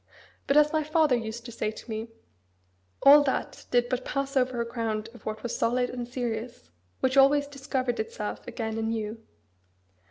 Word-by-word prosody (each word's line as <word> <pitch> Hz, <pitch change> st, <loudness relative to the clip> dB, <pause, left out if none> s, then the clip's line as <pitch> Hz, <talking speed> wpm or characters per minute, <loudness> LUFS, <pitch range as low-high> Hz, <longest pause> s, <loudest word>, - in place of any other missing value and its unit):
But, 280 Hz, -, +4 dB
as 300 Hz, +1 st, +5 dB
my 310 Hz, -1 st, +2 dB
father 305 Hz, -3 st, +3 dB
used 230 Hz, 0 st, -5 dB
to 240 Hz, -, -7 dB
say 215 Hz, -2 st, -2 dB
to 220 Hz, -, -10 dB
me, 220 Hz, 0 st, -4 dB, 1.0 s
all 285 Hz, +2 st, +9 dB
that 265 Hz, -, -2 dB
did 245 Hz, 0 st, +3 dB
but 255 Hz, 0 st, -2 dB
pass 275 Hz, +1 st, -3 dB
over 255 Hz, -2 st, +1 dB
a 235 Hz, -, 0 dB
ground 225 Hz, -2 st, -3 dB
of 240 Hz, -, -13 dB
what 215 Hz, 0 st, -4 dB
was 240 Hz, -, -3 dB
solid 245 Hz, +1 st, +1 dB
and 245 Hz, -1 st, -5 dB
serious, 235 Hz, -, -5 dB, 0.3 s
which 260 Hz, +1 st, +1 dB
always 285 Hz, +1 st, +6 dB
discovered 270 Hz, -3 st, -2 dB
itself 210 Hz, -1 st, -4 dB
again 225 Hz, -2 st, -3 dB
anew. 225 Hz, 0 st, -3 dB
245 Hz, 170 wpm, -27 LUFS, 225-270 Hz, 1.0 s, all